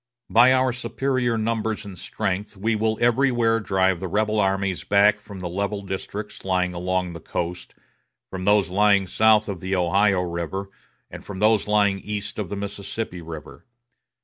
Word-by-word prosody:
By 120 +3 +7
our 130 -1 +3
superior 120 0 -1
numbers 110 -1 -2
and 100 -2 -8
strength 95 +3 -3
we 110 +3 0
will 110 0 0
everywhere 120 -2 +3
drive 95 -4 +1
the 95 - -4
rebel 105 +3 0
armies 95 -2 0
back 105 +1 +4
from 100 -3 -10
the 90 - -3
level 100 +3 -3
districts 100 +2 -6
lying 90 -1 0
along 90 0 -2
the 85 - -8
coast, 90 +1 -5 0.5
from 95 -1 -6
those 100 -1 +3
lying 100 +1 +3
south 110 +2 +3
of 100 -4 -4
the 95 +3 -2
Ohio 95 +2 +2
River, 90 +3 -4 0.4
and - - -9
from 100 - -8
those 110 +1 +3
lying 100 -2 +2
east 105 +2 -5
of 100 -5 -3
the - - -3
Mississippi 100 -1 -5
River. 80 -2 -9
100 Hz, 165 wpm, -23 LUFS, 95-110 Hz, 0.5 s, By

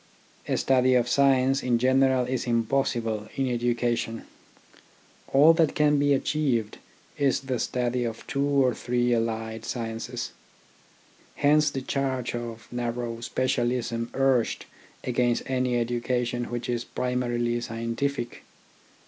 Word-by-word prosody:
A - - 0
study 130 -1 +3
of 120 -1 +3
science 135 0 +3
in 120 -2 +2
general 130 +1 +3
is 125 0 -2
impossible 115 -2 0
in 135 -1 0
education, 120 -1 -1 1.1
all 150 +4 +7
that 165 -2 +2
can 150 -1 +3
be 145 0 +3
achieved 130 -7 -1 0.4
is 140 -2 +2
the 130 -3 -3
study 125 +1 -1
of 115 -1 -5
two 140 - -1
or 140 -3 +3
three 120 +1 0
allied 110 -1 -2
sciences. 115 +1 -4 1.0
Hence 150 +1 +4
the 135 -2 -5
charge 130 -3 -2
of 115 -2 -6
narrow 120 -1 -3
specialism 120 -2 -1
urged 135 -3 +1 0.4
against 120 -1 +1
any 125 -2 0
education 120 +1 -1
which 120 +1 -4
is 120 -1 -1
primarily 120 -2 -1
scientific. 120 +3 -3
125 Hz, 120 wpm, -26 LUFS, 120-135 Hz, 1.1 s, all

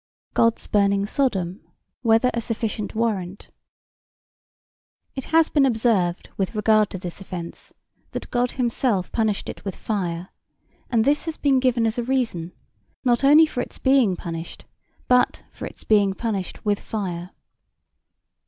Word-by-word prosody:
God's 230 0 +2
burning 200 -1 +2
Sodom 200 -8 -1 0.4
whether 230 +1 +4
a 235 - -1
sufficient 225 -2 -3
warrant? 205 -5 -2 1.6
It 265 - -5
has 325 0 +4
been 290 - +3
observed 220 -8 +1
with 195 +3 -2
regard 215 -1 +3
to - - -5
this 180 +1 -7
offence 175 -3 -8 0.4
that - - -7
God 245 0 +1
himself 235 -6 0
punished 220 -3 0
it - - -7
with 195 -3 -4
fire; 180 -4 -3 0.6
and 230 -3 +2
this 290 +3 +2
has 325 -1 -4
been 275 -2 +3
given 250 -3 +2
as 225 +2 0
a - - 0
reason, 230 -10 -1 0.5
not 240 +1 +3
only 300 +4 +8
for 250 -5 -3
its - - -7
being 260 -8 +3
punished 165 -1 -7 0.4
but 250 0 +3
for - - -7
its - - -12
being 200 -3 +3
punished 205 -5 -4
with 205 -1 +1
fire. 180 -5 -4
220 Hz, 145 wpm, -23 LUFS, 190-250 Hz, 1.6 s, only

